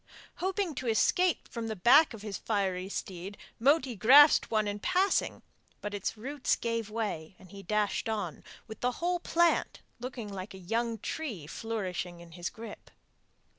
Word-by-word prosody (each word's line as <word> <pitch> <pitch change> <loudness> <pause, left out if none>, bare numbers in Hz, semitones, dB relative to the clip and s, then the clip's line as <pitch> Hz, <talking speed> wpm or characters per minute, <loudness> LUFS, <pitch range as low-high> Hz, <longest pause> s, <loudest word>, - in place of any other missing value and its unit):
Hoping 380 -2 -1
to 255 - -5
escape 340 - +2
from 230 -2 -5
the 220 - -3
back 245 - +6
of 210 - -11
his 210 -3 -5
fiery 190 -3 -1
steed 190 0 -6 0.2
Moti 270 0 +3
grasped 275 - +7
one 215 -2 +1
in 205 0 -3
passing, 370 - +1 0.4
but 210 0 -5
its 205 +2 -3
roots 270 +5 -1
gave 230 -2 -2
way, 205 -7 -4
and 185 - -16
he 200 -1 -9
dashed 210 +3 0
on, 200 -9 -3 0.2
with 220 -1 -10
the 250 0 0
whole 350 +4 -1
plant 340 0 +1 0.2
looking 245 -2 -6
like 190 +1 -7
a - - -8
young 225 +5 -1
tree 220 - -5
flourishing 185 -2 -4
in 170 -1 -13
his 175 +1 -4
grip. 225 -1 -10
220 Hz, 165 wpm, -30 LUFS, 195-255 Hz, 0.4 s, grasped